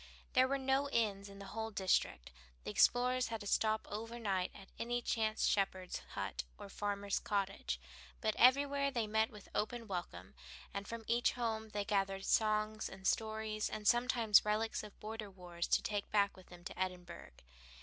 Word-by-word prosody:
There 255 0 +5
were 275 +1 +1
no 270 +1 +1
inns 205 -5 0
in 200 - -11
the 200 - -8
whole 225 0 -2
district. 190 - 0 0.3
The - - -4
explorers 250 - +4
had 225 -1 -4
to - - -7
stop 215 +2 +1
over 225 +3 -5
night 195 -5 0
at 195 -1 -12
any 240 +1 0
chance 220 -2 0
shepherd's 190 -2 0 0.2
hut - - -3
or - - -9
farmer's 200 0 -1
cottage, 195 - -1 0.4
but 215 0 0
everywhere 280 +2 +5
they 240 -5 -1
met 220 +1 +2
with 210 -2 -12
open 230 +2 -2
welcome, 135 - -5 0.4
and 200 0 -4
from 230 -1 -5
each 235 +1 +3
home 220 -2 -2
they 205 -1 -2
gathered 195 -1 0
songs 215 0 +2
and 190 0 -11
stories, 220 0 0
and 215 -1 -4
sometimes 240 -3 +5
relics 215 +1 0
of 210 -2 -12
border 215 -1 -6
wars 175 -2 -5
to - - +3
take 205 -1 -2
back 200 -1 +2
with 185 - -15
them 175 -1 -13
to 180 - -8
Edinburgh. 180 - -4
215 Hz, 175 wpm, -36 LUFS, 195-230 Hz, 0.4 s, There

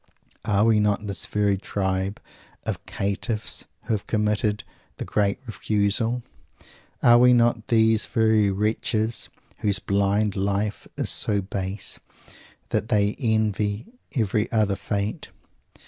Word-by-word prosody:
Are 105 0 +3
we 110 -2 +4
not 105 0 +1
this 100 -1 -3
very 100 -2 +1
tribe 95 0 -2 0.5
of - - -3
caitiffs 105 +3 -1 0.2
who 115 - -1
have 105 - -3
committed 105 0 0 0.3
the - - -5
"Great 100 -1 +1
Refusal?" 110 +3 0 0.8
Are 120 -1 +7
we 125 0 +6
not 120 -2 +2
these 110 -2 +3
very 110 -2 +3
wretches 110 +2 -1 0.3
whose 100 -2 +1
blind 100 +2 +1
life 100 +1 -1
is - - +1
so 105 -1 +1
base 95 0 -3 0.7
that 110 - -1
they 105 -2 +2
envy 110 - 0 0.2
every 110 -3 0
other 105 -3 +2
Fate? 100 +1 -3
105 Hz, 120 wpm, -24 LUFS, 100-110 Hz, 0.8 s, Are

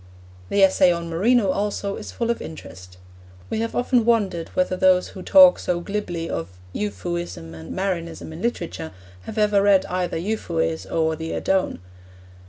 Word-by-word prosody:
The 200 - +3
essay 190 -1 +5
on 170 -1 -3
Marino 205 +4 +3
also 200 0 -2
is 215 - -8
full 235 0 -1
of 235 - -3
interest. 90 - -10 0.5
We - - -1
have 230 0 -3
often 245 -1 +2
wondered 205 -8 +1
whether 185 0 +1
those 185 0 +3
who 185 - -10
talk 275 +5 +7
so 175 -1 -1
glibly 175 -3 -4
of 80 - -4 0.2
Euphuism 175 - -4
and 80 0 -9
Marinism 170 -4 -3
in 160 - -9
literature 175 -8 -3 0.3
have 220 - -7
ever 210 -2 +3
read 200 -1 +4
either 180 -2 -2
Euphues 165 -4 -2
or 160 -1 0
the 160 +1 -5
Adone. 190 -1 0
185 Hz, 160 wpm, -23 LUFS, 165-210 Hz, 0.5 s, talk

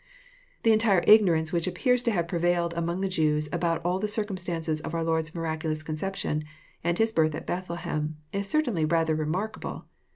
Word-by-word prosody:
The 225 - +5
entire 215 -5 +3
ignorance 175 -6 +5
which 170 0 +1
appears 250 +6 +2
to 240 -2 +1
have 170 -5 0
prevailed 170 0 +1
among 170 +2 -2
the 195 - +1
Jews, 150 -4 +1
about 165 -1 0
all 180 +1 +1
the 210 - -1
circumstances 185 -7 -2
of 170 - -5
our 165 - 0
Lord's 160 0 -1
miraculous 160 -1 -2
conception, 155 -1 -2 0.4
and 170 +1 +1
His 225 0 +2
birth 155 -6 +2
at 155 - -6
Bethlehem, 170 -4 -3 0.2
is 200 0 -2
certainly 245 - +1
rather 160 0 +2
re 155 -1 -1
markable. 195 +7 -4
170 Hz, 175 wpm, -27 LUFS, 160-195 Hz, 0.4 s, The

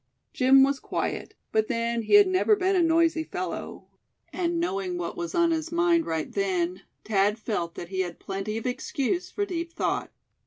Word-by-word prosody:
Jim 265 +1 +6
was 275 0 +1
quiet; - - -3 0.2
but 220 0 +2
then 230 0 -1
he 225 - +3
had 410 0 +9
never 370 +3 +3
been 385 0 +1
a 365 - +4
noisy 330 -1 +3
fellow; 370 +3 -5 0.5
and 340 -2 -1
knowing 195 - -2
what 175 -1 -4
was 170 -1 -4
on 340 -1 +3
his 320 0 -2
mind 340 -1 +2
right 160 -1 -2
then, 185 -2 -1 0.2
Thad 205 0 +2
felt 190 -7 -3
that 175 - -7
he 190 -1 -4
had 175 -2 -2
plenty 195 +3 -4
of 225 - -6
excuse 275 +7 -2
for 405 - -2
deep 335 -3 -4
thought. - - -2
260 Hz, 185 wpm, -26 LUFS, -, 0.5 s, had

